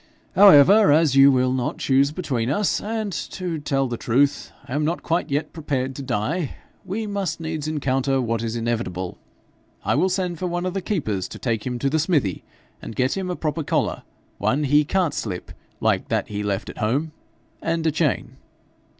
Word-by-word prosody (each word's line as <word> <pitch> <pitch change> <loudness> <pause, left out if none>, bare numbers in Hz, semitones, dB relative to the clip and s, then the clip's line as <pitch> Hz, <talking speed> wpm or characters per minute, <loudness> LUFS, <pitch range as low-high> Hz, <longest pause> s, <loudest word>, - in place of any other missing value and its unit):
However, 195 +1 +8
as 150 -2 +4
you 135 +1 +8
will 130 -1 +2
not 130 -2 -2
choose 135 +1 +2
between 140 -9 -2
us 195 +8 +1
and 215 -2 -3
to 170 +2 -4
tell 140 -2 0
the 120 -1 -4
truth, 140 +6 +1 0.2
I - - -6
am 150 +2 0
not 165 +3 +1
yet - - -19
quite 160 -3 -1
prepared 135 -5 -2
to 140 - -6
die 135 - -2 0.3
we 200 +4 -3
must 200 -4 -2
needs 160 -2 -4
encounter 135 -3 0
what 115 -2 -1
is 115 0 -3
inevitable. 115 -6 -3 0.7
I - - +2
will 190 - +2
send 180 -3 -2
for 185 - -1
one 175 +1 -2
of 185 - -2
the 195 - -2
keepers 110 - -2
to - - -9
take 115 -2 -2
him 125 -1 -2
to 140 - -1
the 155 +3 +1
smithy, 145 - 0 0.4
and 115 - -8
get 130 +1 +1
him 190 -2 -3
a 180 - -2
proper 160 0 -2
collar - - 0 0.4
one 145 +3 +1
he 145 +2 +4
can't 180 0 +1
slip 90 -5 -5 0.3
like - - +1
that - - -1
he 105 0 -3
left 100 -1 -2
at - - -13
home 140 +9 0 0.5
and 165 0 -1
a 160 - +3
chain.' 155 -2 -1
145 Hz, 195 wpm, -23 LUFS, 125-175 Hz, 0.7 s, However